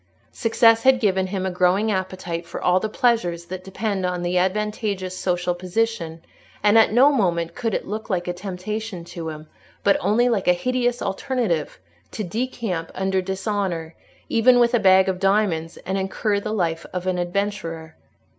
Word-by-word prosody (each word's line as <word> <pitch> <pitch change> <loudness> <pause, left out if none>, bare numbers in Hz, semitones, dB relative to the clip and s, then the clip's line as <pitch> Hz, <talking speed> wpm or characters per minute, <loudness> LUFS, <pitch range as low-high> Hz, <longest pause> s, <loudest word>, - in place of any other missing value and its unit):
Success 225 0 +4
had 260 -1 +5
given 190 -4 +1
him 190 0 -3
a 190 - -1
growing 185 +4 +2
appetite 185 -3 -3
for 170 - -6
all 180 +1 +3
the 215 - -3
pleasures 210 -8 +1
that 185 +1 -7
depend 195 0 -3
on 180 -1 -2
an 175 +1 -1
advantageous 195 0 -1
social 180 -1 -1
position, 175 -2 -2 0.4
and 210 +1 +5
at 225 -2 +6
no 260 +6 +6
moment 170 - 0
could 225 -2 -2
it - - -3
look 215 +2 -5
like 180 -3 -1
a 175 - -1
temptation 190 +1 -5
to 170 -1 -6
him, 155 0 -9 0.4
but 200 - +4
only 240 +4 +2
like 220 -6 0
a 180 - +6
hideous 245 +5 -1
alternative, 195 - -1 0.3
to 215 - -5
decamp 215 -4 -3
under 190 0 0
dishonour, 190 -3 -3 0.3
even 245 +2 +4
with 240 0 +4
a 240 - +4
bag 190 -2 +5
of 185 -1 -1
diamonds, 195 -5 +1
and 190 +2 -1
incur 200 +2 -1
the 210 - -4
life 165 -6 -1
of 180 0 -4
an 185 -1 0
adventurer. 175 -3 -3
190 Hz, 175 wpm, -23 LUFS, 175-215 Hz, 0.4 s, at